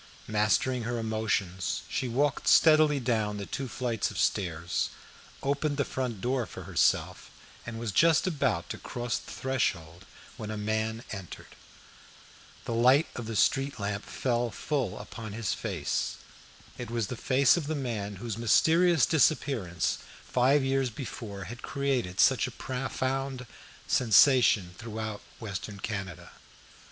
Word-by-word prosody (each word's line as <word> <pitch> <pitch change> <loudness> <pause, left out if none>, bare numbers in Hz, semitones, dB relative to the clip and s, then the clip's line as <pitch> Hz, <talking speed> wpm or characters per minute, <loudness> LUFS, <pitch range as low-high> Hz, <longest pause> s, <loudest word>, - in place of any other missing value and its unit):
Mastering 110 +4 +1
her 120 +1 -2
emotions, 110 -5 -1
she 130 - -2
walked 135 +3 0
steadily 155 -2 +6
down 110 -4 0
the 100 - -5
two 135 +5 -4
flights 120 -2 -2
of - - -8
stairs, 85 -3 0 0.5
opened 140 +1 0
the 140 - +1
front 125 -6 -3
door 125 0 0
for - - -9
herself, - - +1 0.4
and 115 -1 -5
was 115 -2 -3
just 165 - +4
about 170 -6 0
to - - -6
cross 120 -1 -3
the - - -13
threshold 95 -10 -2 0.3
when 110 -2 -6
a 110 - -4
man 110 +2 -2
entered. 95 -5 -8 1.1
The - - -2
light 130 +7 +4
of 120 -2 -5
the 115 - -4
street 135 +4 +2
lamp 100 0 -2
fell 120 -2 -1
full 130 -4 -2
upon 110 0 -8
his 110 -2 -1
face. - - -2 0.6
It 120 - -5
was 115 -2 -1
the 125 - -5
face 130 +2 +4
of 165 -5 -3
the 155 - -1
man 110 -7 -3
whose 110 +2 -5
mysterious 160 +5 +4
disappearance 135 - +1 0.3
five 135 +3 +3
years 135 -1 +1
before 110 -5 -7
had 115 +6 -8
created 135 -10 -2
such - - +4
a - - -10
profound 130 0 -3 0.4
sensation 110 -4 +5
throughout 110 -2 -5 0.2
Western 100 -1 -6
Canada. 95 -5 -5
120 Hz, 140 wpm, -29 LUFS, 105-135 Hz, 1.1 s, steadily